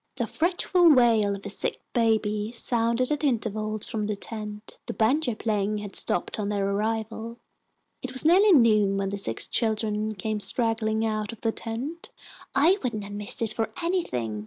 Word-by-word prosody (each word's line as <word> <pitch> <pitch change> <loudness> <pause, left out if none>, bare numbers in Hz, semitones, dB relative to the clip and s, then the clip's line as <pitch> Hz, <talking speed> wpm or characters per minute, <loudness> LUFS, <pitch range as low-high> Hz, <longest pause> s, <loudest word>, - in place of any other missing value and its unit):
The - - -1
fretful 350 0 +2
wail 225 -5 +3
of 200 - -11
a - - -4
sick - - -1
baby 220 -2 +1
sounded 235 +2 0
at 295 0 -1
intervals 215 -5 -1
from 215 -2 -3
the 210 - -2
tent. 210 0 -8
The - - -5
banjo 245 +2 +1
playing 210 -1 -1
had 205 -2 -7
stopped 175 - 0
on 205 -1 -2
their 200 -1 -1
arrival. 220 +3 -3 0.6
It 260 - -5
was 260 +3 +3
nearly 385 +6 +6
noon 215 - +4
when 195 -1 -1
the 200 - -4
six 115 -12 -1
children 215 -1 -1
came 215 +2 -3
straggling 220 +1 0
out 215 0 -2
of 230 - -12
the 225 - +1
tent. 250 +10 -6 0.5
"I 335 +9 +4
wouldn't 230 -5 -3
have 200 0 -8
missed 210 +3 +2
it 220 -1 0
for 225 - -2
anything!" 125 - -2
220 Hz, 175 wpm, -26 LUFS, 210-240 Hz, 0.6 s, nearly